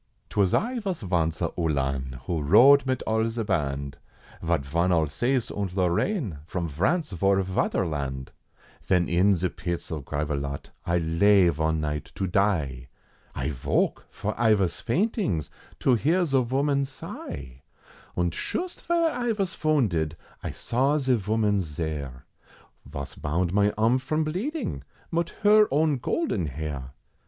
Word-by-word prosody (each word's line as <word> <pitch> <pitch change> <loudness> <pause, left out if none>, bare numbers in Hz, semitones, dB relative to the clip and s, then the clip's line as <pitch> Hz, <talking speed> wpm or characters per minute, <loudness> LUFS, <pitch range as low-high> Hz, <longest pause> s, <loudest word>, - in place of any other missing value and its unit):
'Twas 100 -3 +2
I 245 +2 +1
vos 190 - -3
vonce 85 -4 0
a 85 - 0
Uhlan, 70 -4 -1
who 85 -3 -1
rode 135 - +6
mit 130 -1 0
all 110 +1 +1
ze 115 0 -3
band, 70 -8 -2 0.5
Zat 70 - 0
von 85 +6 +1
Alsace, 90 - +1
und 100 -3 -3
Lorraine, 95 - 0
from 85 -1 -2
Vrance 130 - 0
vor 95 +3 +3
Vaterland, 75 -8 -1 0.5
Ven 90 -2 +2
in 95 +4 +4
ze 90 +1 0
pits 85 0 -5
at 75 -3 -4
Gravelotte, 70 -1 -3 0.2
I 85 0 +2
lay 90 +3 +4
von 80 -1 0
night 75 -1 -3
to 95 - -1
die, 80 -10 0 0.5
I 70 +3 -2
voke! 65 - 0
for 105 - -3
I 110 -2 +5
vos 95 -4 0
faintings 170 - 0 0.3
to 130 - +3
hear 165 +10 +2
ze 135 -4 +2
voman 140 +3 +1
sigh! 70 - -8 0.6
Und 85 -2 +1
shust 355 - -4
vere 335 -1 +2
I 240 -3 -1
vas 195 -4 -1
vounded, 100 - +1 0.3
I - - -4
saw 135 +5 +1
ze 130 -3 +2
voman's 105 -6 0
zere, 70 -6 -4 0.6
Vos 70 -1 -6
bound 85 +4 -1
mine 105 +1 +3
arm 115 +4 +3
from 155 +5 -1
bleeding, 190 - -3 0.3
mit 170 0 0
her 210 0 +7
own 150 0 +2
golden 125 - -1
hair! 70 -2 -5
95 Hz, 145 wpm, -26 LUFS, -, 0.6 s, her